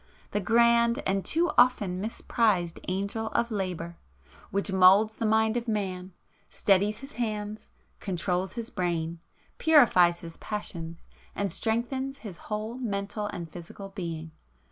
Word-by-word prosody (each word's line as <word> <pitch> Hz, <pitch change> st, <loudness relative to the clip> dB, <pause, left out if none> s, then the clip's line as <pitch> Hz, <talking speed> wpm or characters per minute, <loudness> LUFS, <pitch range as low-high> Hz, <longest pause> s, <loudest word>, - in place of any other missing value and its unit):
—the 205 Hz, -, 0 dB
grand 235 Hz, +3 st, +4 dB
and 195 Hz, 0 st, +1 dB
too 340 Hz, +2 st, +2 dB
often 205 Hz, -7 st, +3 dB
misprized 210 Hz, -5 st, 0 dB
Angel 200 Hz, +4 st, -2 dB
of 235 Hz, 0 st, +1 dB
Labour, 180 Hz, -4 st, -3 dB, 0.5 s
which 200 Hz, +1 st, -1 dB
moulds 190 Hz, +4 st, +6 dB
the 225 Hz, -, 0 dB
mind 220 Hz, +1 st, +3 dB
of 240 Hz, 0 st, -2 dB
man, 190 Hz, -4 st, -2 dB, 0.4 s
steadies 205 Hz, +3 st, +2 dB
his 275 Hz, +1 st, -9 dB
hands, 215 Hz, -3 st, -4 dB, 0.3 s
controls 185 Hz, 0 st, -2 dB
his 235 Hz, -1 st, -6 dB
brain, 170 Hz, -4 st, -2 dB, 0.4 s
purifies 185 Hz, -, +5 dB
his 165 Hz, -1 st, -8 dB
passions, 170 Hz, -6 st, -6 dB, 0.3 s
and 200 Hz, -2 st, -1 dB
strengthens 260 Hz, +7 st, -1 dB
his 205 Hz, -10 st, -9 dB
whole 215 Hz, +3 st, -3 dB
mental 205 Hz, -2 st, -3 dB
and 170 Hz, -5 st, -6 dB
physical 175 Hz, +4 st, -9 dB
being. 165 Hz, -5 st, -6 dB
205 Hz, 130 wpm, -28 LUFS, 180-230 Hz, 0.5 s, moulds